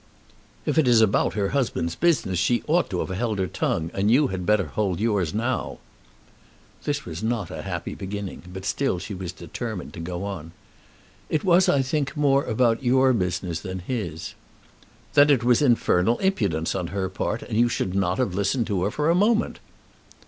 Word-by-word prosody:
"If - - +2
it 150 - +3
is 120 -2 +6
about 110 -2 +2
her 100 -2 0
husband's 120 -11 -1
business 130 - +1
she 120 +6 +1
ought 170 +3 +2
to 90 - -2
have - - -4
held 110 +1 -1
her 95 - 0
tongue, 80 -1 -2
and 100 +2 +1
you 135 +4 +4
had 90 -2 -4
better 105 -2 +3
hold 95 +2 -2
yours 105 -7 +1
now." 120 +4 -2 1.1
This 145 -1 -2
was 85 +1 -6
not 110 -5 -2
a - - -5
happy - - -4
beginning, 100 0 -6
but 95 +1 -7
still 135 -9 0
she 100 +4 -6
was 90 -2 -5
determined 95 +4 -6
to 95 - -8
go 90 +2 -4
on. 85 -5 -6 0.8
"It 155 - 0
was 185 -1 +4
I 135 -1 +3
think 140 +2 -2
more 140 -1 +3
about 115 +1 +2
your 130 +1 +4
business 90 -4 -1
than 95 +2 -5
his." 90 -6 -4 0.8
"Then 145 +1 +6
it 135 -5 +4
was 120 +1 +4
infernal 115 -5 +3
impudence 100 - 0
on 90 -3 -2
her 95 +2 -2
part, 105 +4 -3
and 110 - -5
you 120 +2 +4
should 95 -6 -2
not 100 +1 0
have 125 -8 0
listened 100 +6 0
to 100 -5 -1
her - - +1
for 150 +7 -1
a 165 - +4
moment." 215 +5 +2
105 Hz, 190 wpm, -24 LUFS, 95-130 Hz, 1.1 s, is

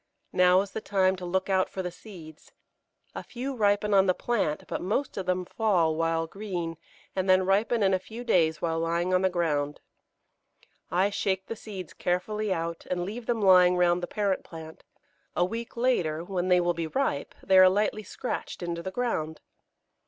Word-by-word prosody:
Now 180 +1 +5
is 200 -1 -6
the 220 - -5
time 190 -2 +2
to 180 -1 -6
look 190 +2 0
out 190 -1 +1
for 190 - -5
the 180 - -4
seeds. 170 -5 -13 0.6
A - - -5
few 260 +3 -5
ripen 205 -1 +2
on 195 -1 +5
the 185 - +3
plant, 205 -11 -1
but - - -4
most 220 +9 -1
of 190 -2 -4
them 180 0 0
fall 175 -7 +1
while 165 0 0
green, 175 -3 -5 0.4
and 190 0 -1
then 185 0 +5
ripen 210 +4 +2
in 190 -1 +3
a 185 - +2
few 225 +5 -9
days 165 -9 +2
while 165 -1 0
lying 170 +2 0
on 185 - +3
the 190 - +3
ground. 150 -5 -1 1.1
I 190 +3 +2
shake 190 -1 -1
the 230 - -5
seeds 195 -6 -8
carefully 210 +4 -1
out, 165 -1 -3
and 175 -1 -1
leave 225 +4 -7
them 230 -3 0
lying 180 -2 +6
round 175 0 +3
the 175 - -3
parent 200 -3 -1
plant; 160 -1 -11 0.5
a 175 - +3
week 230 +5 -6
later, 175 -11 +1
when 180 0 -2
they 180 -1 +5
will 175 0 +1
be 165 -1 -3
ripe, 160 - -2
they 190 -1 +5
are 185 0 +9
lightly 210 +2 0
scratched 185 - -5
into 170 -1 -3
the 190 - -4
ground. 190 -8 -2
185 Hz, 190 wpm, -27 LUFS, 170-205 Hz, 1.1 s, are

